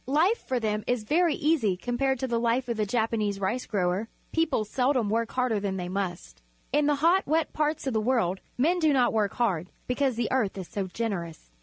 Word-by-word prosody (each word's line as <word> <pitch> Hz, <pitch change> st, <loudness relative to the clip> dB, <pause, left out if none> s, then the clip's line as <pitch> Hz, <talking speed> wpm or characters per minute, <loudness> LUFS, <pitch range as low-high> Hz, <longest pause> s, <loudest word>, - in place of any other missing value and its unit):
Life 330 Hz, -, +3 dB
for 255 Hz, -1 st, 0 dB
them 215 Hz, -2 st, -1 dB
is 245 Hz, -3 st, 0 dB
very 325 Hz, +7 st, +2 dB
easy 270 Hz, -, +1 dB
compared 260 Hz, +4 st, -1 dB
with 260 Hz, -1 st, -3 dB
the 235 Hz, -, +2 dB
hfe 240 Hz, +2 st, +1 dB
of 235 Hz, -, -1 dB
the 215 Hz, -1 st, 0 dB
Japanese 220 Hz, -3 st, 0 dB
rice 215 Hz, +6 st, -2 dB
grower. 195 Hz, +1 st, 0 dB, 0.2 s
People 315 Hz, -9 st, +1 dB
seldom 250 Hz, -1 st, +1 dB
work 230 Hz, +1 st, 0 dB
harder 250 Hz, -4 st, +1 dB
than 195 Hz, -1 st, -2 dB
they 180 Hz, -1 st, -4 dB
must. 185 Hz, -, -4 dB, 0.3 s
In 295 Hz, 0 st, +3 dB
the 295 Hz, -, +3 dB
hot, 370 Hz, +3 st, +4 dB
wet 315 Hz, +1 st, +1 dB
parts 305 Hz, 0 st, -1 dB
of 265 Hz, -, -1 dB
the 220 Hz, -, +1 dB
world 215 Hz, -6 st, +1 dB, 0.2 s
men 335 Hz, +8 st, +2 dB
do 310 Hz, -3 st, +3 dB
not 255 Hz, -3 st, +3 dB
work 210 Hz, -3 st, 0 dB
hard, 185 Hz, -8 st, 0 dB, 0.2 s
because 260 Hz, 0 st, 0 dB
the 230 Hz, -1 st, -1 dB
earth 225 Hz, -7 st, 0 dB
is 185 Hz, -3 st, -6 dB
so 195 Hz, -2 st, -3 dB
generous. 175 Hz, -, -4 dB
235 Hz, 210 wpm, -27 LUFS, 205-270 Hz, 0.3 s, hot